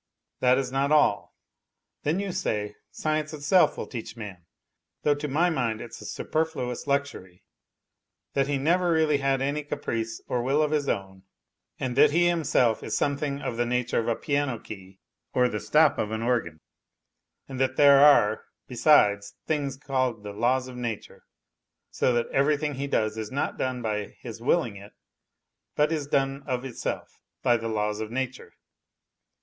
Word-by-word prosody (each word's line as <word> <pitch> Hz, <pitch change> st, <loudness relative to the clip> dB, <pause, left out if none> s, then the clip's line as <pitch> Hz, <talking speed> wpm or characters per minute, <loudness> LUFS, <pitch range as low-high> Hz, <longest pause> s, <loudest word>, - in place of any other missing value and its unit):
That 125 Hz, 0 st, +4 dB
is 130 Hz, -2 st, -2 dB
not 135 Hz, +2 st, 0 dB
all; 145 Hz, -9 st, +2 dB, 0.7 s
then, 155 Hz, +6 st, 0 dB
you 200 Hz, -1 st, -2 dB
say, 105 Hz, -, -2 dB
science 155 Hz, 0 st, -2 dB
itself 155 Hz, +5 st, +3 dB
will -, -, -4 dB
teach 120 Hz, -1 st, -7 dB
man 95 Hz, -6 st, -9 dB, 0.6 s
(though 150 Hz, -, +4 dB
to 145 Hz, +1 st, -4 dB
my 165 Hz, +6 st, +2 dB
mind 115 Hz, -7 st, -1 dB
it's 120 Hz, -, -9 dB
a -, -, -9 dB
superfluous 155 Hz, -6 st, -3 dB
luxury) 140 Hz, -11 st, -2 dB, 0.9 s
that 135 Hz, -1 st, +1 dB
he 145 Hz, -1 st, 0 dB
never 170 Hz, +4 st, +2 dB
has -, -, +3 dB
really 150 Hz, -2 st, +3 dB
had 135 Hz, -1 st, +1 dB
any 145 Hz, +2 st, -1 dB
caprice 115 Hz, -6 st, -3 dB
or 125 Hz, -, -1 dB
will 140 Hz, +5 st, +2 dB
of 150 Hz, -, -1 dB
his 145 Hz, -2 st, 0 dB
own, 95 Hz, -1 st, -3 dB, 0.6 s
and 125 Hz, -2 st, -2 dB
that 150 Hz, +1 st, +7 dB
he 170 Hz, +4 st, +3 dB
himself 140 Hz, -9 st, +2 dB
is -, -, -2 dB
something 140 Hz, 0 st, -1 dB
of 115 Hz, -, -3 dB
the 120 Hz, -, +1 dB
nature 125 Hz, 0 st, 0 dB
of 115 Hz, -, -2 dB
a 115 Hz, -, +1 dB
piano 140 Hz, -4 st, -1 dB
key 95 Hz, -3 st, -11 dB, 0.4 s
or 125 Hz, -1 st, +4 dB
the 105 Hz, -3 st, -3 dB
stop 155 Hz, +4 st, +3 dB
of 105 Hz, -, -1 dB
an 110 Hz, +1 st, -3 dB
organ, 115 Hz, -11 st, -1 dB, 0.9 s
and 130 Hz, -2 st, -7 dB
that 130 Hz, 0 st, +1 dB
there 140 Hz, -1 st, +7 dB
are, 110 Hz, -8 st, +5 dB, 0.2 s
besides, 105 Hz, -7 st, +3 dB
things 140 Hz, -4 st, -1 dB
called 130 Hz, -6 st, -1 dB
the 105 Hz, -1 st, -6 dB
laws 125 Hz, +4 st, +1 dB
of 130 Hz, -, -9 dB
nature; 120 Hz, -4 st, -6 dB, 0.7 s
so -, -, +1 dB
that 120 Hz, -1 st, +1 dB
everything 145 Hz, +2 st, +1 dB
he 140 Hz, +1 st, -4 dB
does 110 Hz, -4 st, 0 dB
is 110 Hz, -1 st, -4 dB
not 140 Hz, -, -2 dB
done 130 Hz, -1 st, -2 dB
by 105 Hz, -2 st, -3 dB
his 115 Hz, -2 st, -8 dB
willing 120 Hz, -5 st, +1 dB
it, 100 Hz, +1 st, -13 dB, 0.8 s
but 150 Hz, +1 st, +2 dB
is 150 Hz, -3 st, -2 dB
done 135 Hz, 0 st, 0 dB
of 130 Hz, -1 st, -2 dB
itself, 130 Hz, -, -5 dB, 0.2 s
by 120 Hz, -, +4 dB
the 115 Hz, -1 st, -3 dB
laws 105 Hz, -1 st, -1 dB
of 110 Hz, -1 st, -4 dB
nature. 130 Hz, +2 st, -5 dB
130 Hz, 175 wpm, -26 LUFS, 115-145 Hz, 0.9 s, that